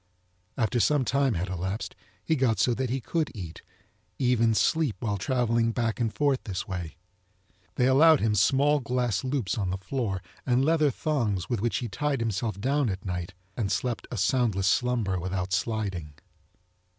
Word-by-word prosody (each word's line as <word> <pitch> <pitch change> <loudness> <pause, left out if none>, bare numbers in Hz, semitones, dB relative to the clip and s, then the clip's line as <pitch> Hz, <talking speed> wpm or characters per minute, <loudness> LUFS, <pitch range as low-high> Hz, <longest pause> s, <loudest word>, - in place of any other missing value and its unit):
After 120 +1 +1
some 145 +2 +3
time 135 -3 +2
had 90 +2 -2
elapsed 95 +3 -4 0.3
he 160 - +2
got 130 -6 +2
so 125 - +3
that 130 +1 -2
he 130 +2 -1
could 160 +6 -1
eat, 90 -6 -7 0.6
even 120 -4 +2
sleep 155 -1 +2
while 105 -4 -2
travelling 115 -1 +1
back 115 0 -1
and 115 -2 0
forth 140 -1 0
this 95 -2 -4
way. 90 -4 -5 0.8
They 125 - +2
allowed 150 +4 +6
him 110 -1 +1
small 140 +8 +3
glass 125 -5 -1
loops 130 -6 -1
on 95 -3 -1
the 95 - -2
floor 95 -1 -3 0.2
and 125 +1 +2
leather 155 -1 +3
thongs 120 - -1
with 120 -5 -1
which 120 +1 0
he 120 - -3
tied 135 +7 -1
himself 110 -2 -2
down 135 +3 +1
at 95 0 -5
nite 90 -1 -4 0.2
and 105 -5 -1
slept 115 +4 -2
a 120 - -5
soundless 100 -1 +1
slumber 115 -5 +1
without 90 +1 -3
sliding. 95 -7 -2
115 Hz, 170 wpm, -27 LUFS, 95-130 Hz, 0.8 s, allowed